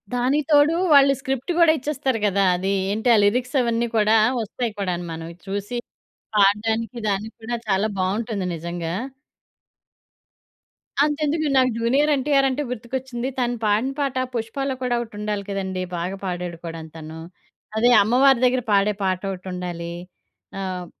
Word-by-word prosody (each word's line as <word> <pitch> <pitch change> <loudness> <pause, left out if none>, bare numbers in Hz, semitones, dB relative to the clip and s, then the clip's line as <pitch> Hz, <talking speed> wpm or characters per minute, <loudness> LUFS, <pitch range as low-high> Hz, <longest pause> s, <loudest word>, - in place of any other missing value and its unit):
దానికి 270 +4 +1
తోడు 295 +3 +5 0.2
వాళ్ళు 275 -1 +7
స్క్రిప్ట్ 270 +3 -3
గూడా 335 -2 +6
ఇచ్చేస్తారు 265 -3 -1
కదా! 200 0 +2
అది 190 +2 -1 0.2
ఏంటి? 220 +4 0
ఆ - - +4
లిరిక్స్ 250 +6 +1
అవన్నీ 235 0 0
కూడా 215 +1 +4 0.3
వస్తాయి 225 +2 -3
కూడాను 180 -2 -2
మనమవి 165 +1 -7
చూసి, 205 +5 -3 0.6
పాడడానికి 220 +4 +2
దానికి 205 +3 -3
కూడా 240 +1 -2
చాలా 195 +3 +2
బావుంటుంది 200 +1 -1
నిజంగా. 170 0 -4 2.1
అంతెందుకు, 305 +1 0
నాకు 255 -1 +4
'జూనియర్ 270 +6 +2
ఎన్‌టిఆర్' 275 0 +2
అంటే 285 +3 -2
గుర్తుకొచ్చింది. 250 +1 -4
తను 245 0 0
పాడిన 215 +6 +2
పాట 275 -2 -1 0.2
'పుష్పాలో' 260 +4 -2
కూడా 245 -1 +1
ఒకటుండాలి 210 -2 -4
కదండీ! 190 -2 -3
బాగా 180 +3 -3
పాడాడు 175 -2 -4
కూడాను 165 -1 -7
తను, 160 +1 -8 0.6
అదే 240 +2 +4
అమ్మవారి 255 +3 +4
దగ్గర 250 0 +2
పాడే 200 +1 +3
పాట 185 -1 0
ఒకటుండాలి. 180 -2 -5 0.7
ఆహ్, 185 -2 -4
225 Hz, 135 wpm, -23 LUFS, 190-260 Hz, 2.1 s, వాళ్ళు